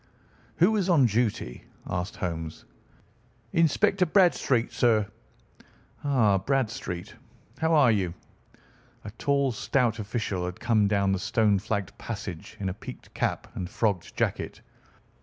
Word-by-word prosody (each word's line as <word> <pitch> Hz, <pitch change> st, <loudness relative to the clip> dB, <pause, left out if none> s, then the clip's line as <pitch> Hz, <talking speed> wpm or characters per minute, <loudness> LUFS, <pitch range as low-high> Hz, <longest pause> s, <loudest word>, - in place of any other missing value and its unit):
"Who 195 Hz, +6 st, +4 dB
is 195 Hz, -2 st, 0 dB
on 155 Hz, -7 st, +5 dB
duty?" 110 Hz, -, -1 dB, 0.2 s
asked 90 Hz, +2 st, -3 dB
Holmes. 80 Hz, -3 st, -5 dB, 0.9 s
"Inspector 185 Hz, +4 st, +3 dB
Bradstreet, 155 Hz, -, +3 dB
sir." 115 Hz, -3 st, +3 dB, 1.0 s
"Ah, 115 Hz, -9 st, +3 dB
Bradstreet, 110 Hz, -7 st, -2 dB, 0.5 s
how 160 Hz, 0 st, +3 dB
are 140 Hz, -6 st, +6 dB
you?" 95 Hz, -5 st, 0 dB, 0.9 s
A 105 Hz, -, -6 dB
tall, 140 Hz, -2 st, +2 dB
stout 120 Hz, 0 st, 0 dB
official 100 Hz, -3 st, -2 dB
had 90 Hz, 0 st, -6 dB
come 110 Hz, -4 st, +3 dB
down 100 Hz, -1 st, +2 dB
the 95 Hz, -, 0 dB
stone 105 Hz, -2 st, +2 dB
flagged 100 Hz, -1 st, -3 dB
passage, -, -, -6 dB
in 100 Hz, -, -2 dB
a -, -, -3 dB
peaked -, -, -11 dB
cap -, -, -2 dB
and 90 Hz, -, -4 dB
frogged 100 Hz, -4 st, -1 dB
jacket. -, -, -2 dB
110 Hz, 125 wpm, -27 LUFS, 95-135 Hz, 1.0 s, are